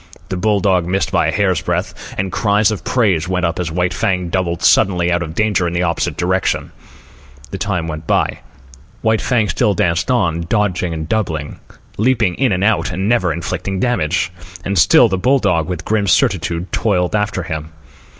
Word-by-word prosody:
The 95 - -2
bull 100 +2 +1
dog 90 -3 +2
missed 95 -3 -1
by - - +2
a - - +1
hair's 95 -5 +1
breadth, - - -4
and 95 0 -2
cries 105 -1 +2
of 105 - -4
praise 95 -10 +1
went 90 -1 0
up 85 +2 -2
as 85 -3 -2
White 90 +2 0
Fang 90 -2 -1
doubled 85 -2 -2
suddenly 90 -2 +3
out 85 0 +1
of 80 -2 -5
danger 105 -4 +1
in 85 - -3
the 85 - +1
opposite 85 -2 -1
direction. 95 +2 -1 0.8
The 95 - -5
time 90 -5 -2
went 80 -1 -6
by. - - +1 0.6
White 110 -1 +2
Fang 115 -5 +1
still 100 +3 +1
danced 85 +3 0
on, 85 -9 0
dodging 95 -5 0
and 80 -1 -5
doubling, 85 -8 -2 0.4
leaping 110 -4 +2
in 130 +5 +1
and 90 0 0
out, 110 +1 +2
and 95 +5 0
ever 95 -8 +1
inflicting 90 +3 -3
damage. 95 -6 0 0.3
And 100 - -1
still 160 - +6
the 95 -3 -2
bull 130 +8 +3
dog, 90 - 0
with 85 -3 -4
grim 105 -2 0
certitude, 90 - +1
toiled 95 -4 0
after 105 -3 -1
him. 80 -2 -5
95 Hz, 190 wpm, -17 LUFS, 85-105 Hz, 0.8 s, still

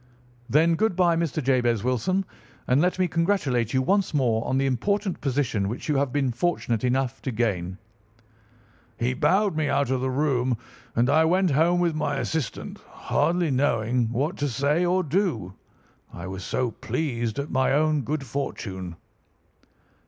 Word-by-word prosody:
"'Then, 160 +4 +4
good 215 +3 +1
bye, 175 -2 +3
Mr. 160 -3 -1
Jabez 120 -4 +2
Wilson, 130 - 0 0.4
and 130 +3 +3
let 180 +2 +1
me 185 -1 +2
congratulate 160 - 0
you 130 -1 +1
once 195 +2 +1
more 115 -5 +2
on 130 - +1
the 135 - +1
important 195 - -1
position 125 -7 0
which 115 - -5
you 150 - +1
have 140 -2 0
been 135 -2 0
fortunate 120 -4 -1
enough 130 +1 0
to - - -3
gain.' 95 -6 -1 1.2
He 125 +2 0
bowed 185 +8 +2
me 155 -2 0
out 140 -3 +1
of 130 -1 0
the 130 - 0
room 130 -3 +1 0.4
and 120 +2 +3
I 155 +4 +4
went 180 +1 +2
home 165 +5 +3
with 175 -2 +1
my 155 -1 -1
assistant, 160 -6 -3
hardly 175 -2 -1
knowing 120 -3 +1
what 145 +10 -1
to 145 -1 -1
say 140 +7 +1
or 180 +1 +2
do, 150 - -1 0.6
I 85 - -8
was 95 0 -6
so 125 +3 -1
pleased 120 -3 -3
at 140 +1 -3
my 130 0 +2
own 155 0 +2
good 140 +2 -3
fortune. 95 -9 -5
135 Hz, 165 wpm, -25 LUFS, 120-165 Hz, 1.2 s, Then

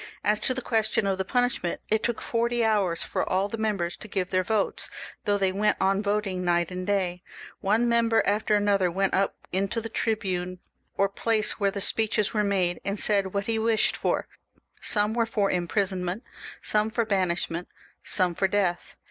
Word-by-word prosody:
As 210 0 +2
to 255 - +1
the 260 - -3
question 220 -2 +1
of 195 -1 0
the - - +1
punishment, 245 -6 0
it 220 0 +2
took 235 -1 -2
forty 235 0 0
hours 200 -6 +1
for - - -2
all 190 +2 +1
the 225 - -4
members 200 -6 -1
to - - -10
give 190 -3 -2
their 185 0 +2
votes, 215 0 -1 0.4
though 205 -1 +2
they 195 -2 +1
went 205 +3 +1
on 195 +1 +2
voting 200 -3 -1
night 175 0 +1
and 180 0 -5
day. 185 -3 0 0.4
One 220 +5 +2
member 230 -1 +3
after 210 +1 +2
another 200 -3 +2
went 195 +2 0
up 195 - +1 0.2
into 195 +4 0
the 225 0 -5
tribunal, 185 -6 -2 0.4
or 200 - +3
place 215 +2 +1
where 200 -1 +2
the 200 0 -5
speeches 215 0 0
were 210 -1 +2
made, 185 -3 0
and 200 +1 -2
said 200 -2 +2
what 200 0 0
he 225 0 0
wished 225 -1 +2
for; - - -1 0.5
some 210 0 +2
were 230 -1 +1
for 205 -3 +1
impri 175 -1 -1 0.2
sonment, 185 +3 -4 0.4
some 210 +1 +2
for 230 0 0
banishment, 180 -4 -1 0.4
some 180 -3 +1
for 190 - +1
death. 190 -3 -1
200 Hz, 190 wpm, -26 LUFS, 185-220 Hz, 0.5 s, member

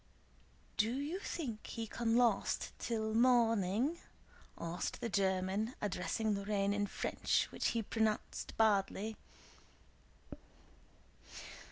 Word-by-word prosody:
"Do 225 +4 +2
you 300 +7 -2
think 255 - -4
he 230 -1 -4
can 230 +1 0
last 235 -5 +2
till 220 -2 -1
morning?" 230 - +3 0.6
asked 170 +2 -3
the 235 - -2
German, 190 +4 0
addressing 210 +2 -1
Lorrain 200 0 0
in 205 0 0
French - - 0
which - - -1
he 230 -1 0
pronounced 220 0 -1
badly. 215 0 +2
220 Hz, 95 wpm, -35 LUFS, 200-235 Hz, 0.6 s, morning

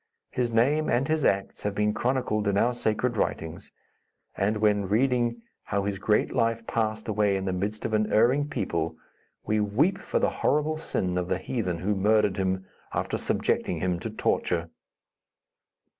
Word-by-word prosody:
His 125 -2 0
name 140 +7 +2
and 130 +3 +2
his 155 -1 +1
acts 95 0 0
have 105 -1 -2
been 105 0 +1
chronicled 120 -5 0
in 100 -1 +2
our 120 +4 +3
sacred 120 +1 0
writings, 80 -5 -3 0.6
and 105 +3 +1
when 105 -2 +2
reading 120 0 +1 0.2
how 100 -1 -1
his 100 -1 -2
great 105 +1 +1
life 115 0 +1
passed 110 -1 -1
away 105 -2 +2
in 95 - -4
the 95 - -1
midst 105 +4 -3
of 110 - -2
an 110 0 +1
erring 135 +7 +3
people, 85 - -2 0.5
we 110 0 +1
weep 135 - +2
for - - -2
the - - +2
horrible 150 +2 +2
sin 90 - -1
of 90 - -3
the 95 - 0
heathen 95 -4 -2
who 95 +5 0
murdered 105 0 +2
him, 95 0 -1 0.3
after - - -2
subjecting - - 0
him 90 -2 -1
to 110 - -4
torture." 85 -5 -1
105 Hz, 170 wpm, -27 LUFS, 95-120 Hz, 0.6 s, our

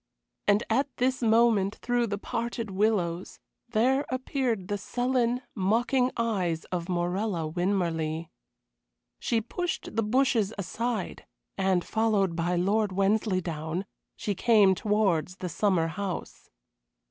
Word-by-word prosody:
And 205 +2 +4
at 265 +6 +2
this 255 +1 +1
moment, 220 -3 +3
through 245 -1 0
the 200 -1 -2
parted 230 0 -3
willows, 190 -3 0 0.3
there 255 +5 +2
appeared 255 -6 -1
the 205 0 -2
sullen, 245 +2 0
mocking 240 +6 +2
eyes 190 -8 0
of 175 -1 -3
Morella 175 0 -1
Winmarleigh. 165 -2 -1 0.9
She 230 -1 0
pushed 345 +3 -4
the 225 - +2
bushes 225 -2 +2
aside, 215 +2 -3 0.3
and, 190 -2 +1
followed 210 -5 +1
by 175 +1 0
Lord 200 +4 +1
Wensleydown, 185 -4 0 0.3
she 205 - -2
came 205 -1 +5
towards 190 -5 +1
the 185 -2 -5
summer 185 -1 +2
house. 190 +3 -5
205 Hz, 115 wpm, -28 LUFS, 180-230 Hz, 0.9 s, came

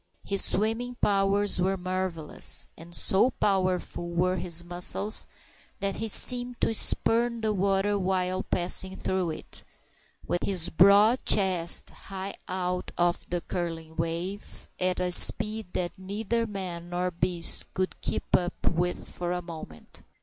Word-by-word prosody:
His 200 -1 +2
swimming 225 +4 -1
powers 200 -2 +1
were 190 +1 0
marvellous, 185 -4 -3
and 170 +1 -5
so 195 +9 +4
powerful 185 -5 -2
were 180 +2 -1
his 175 -1 +1
muscles 175 +4 +2 0.5
that 195 -1 -3
he 225 - -3
seemed 245 +2 +5
to - - +1
spurn 235 +1 +3
the 215 -1 -1
water 200 +1 0
while 185 0 -1
passing 190 +1 0
through 185 -3 -2
it, 155 - -9 0.6
with 175 - -1
his 180 -4 +2
broad 200 +7 +4
chest 185 -4 +3
high 195 0 -8
out 180 0 -4
of 175 0 -1
the 175 0 -3
curling 165 -3 -6
wave, 170 +5 -5
at 185 0 0
a 180 0 -2
speed 215 +3 +5
that 175 +1 -4
neither 220 +4 -3
man 180 -4 -7
nor 180 +1 -2
beast 175 0 +1
could 185 0 -3
keep - - -3
up 180 +1 -2
with 175 +1 -3
for 175 0 -5
a 180 0 -4
moment. 160 - -11
185 Hz, 140 wpm, -26 LUFS, 175-200 Hz, 0.6 s, seemed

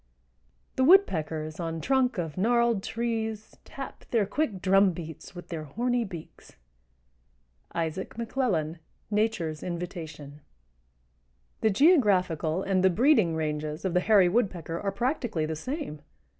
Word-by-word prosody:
_) - - -42
The 260 - +3
woodpeckers 160 - +3
on 165 -1 -3
trunk 260 +4 +1
of 165 -4 -3
gnarled 235 +1 +2
trees 225 -1 -3
Tap 270 -1 -9
their 225 -4 +2
quick 230 -6 -1
drum 195 0 +4
beats 165 +2 -9
with 175 - -10
their 160 -2 -5
horny 240 - 0
beaks. 175 -6 -11 1.2
—Isaac 165 +3 -3
McLellan, 220 - -1 0.3
"Nature's 205 -8 0
Invitation." 165 -5 -6 1.2
The 220 - +3
geographical 190 - +3
and 190 -1 +1
the 190 - +6
breeding 215 - +3
ranges 150 +1 -3
of 185 - 0
the 180 - +4
Hairy 195 -1 +5
Woodpecker 175 -5 -1
are 200 - -1
practically 235 - -1
the 160 0 -3
same. 255 - -5
190 Hz, 130 wpm, -28 LUFS, 160-235 Hz, 1.2 s, the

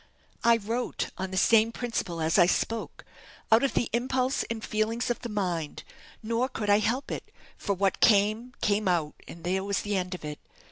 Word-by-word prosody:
I 235 0 +6
wrote 230 +3 -3
on 190 0 -2
the 190 - -4
same 225 +3 +5
principle 230 -9 -3
as 160 +4 +2
I 175 - +7
spoke 225 +4 -2 0.5
out 225 +1 +7
of 275 - 0
the 235 - +2
impulse 255 +2 +1
and 225 -1 -4
feelings 225 +3 -1
of 240 - -2
the 240 - -6
mind; 180 -7 -2 0.4
nor 230 +4 0
could 210 -4 -1
I 205 - +6
help 245 +6 -1
it, - - -6 0.2
for 200 - -2
what 195 +1 +1
came, 215 +3 +3
came 205 0 +1
out, 165 -4 +1
and 170 - -11
there 190 +2 0
was 200 0 -1
the 205 0 -1
end 185 0 -2
of 175 - -9
it. 150 -1 -6
210 Hz, 195 wpm, -28 LUFS, 185-230 Hz, 0.5 s, I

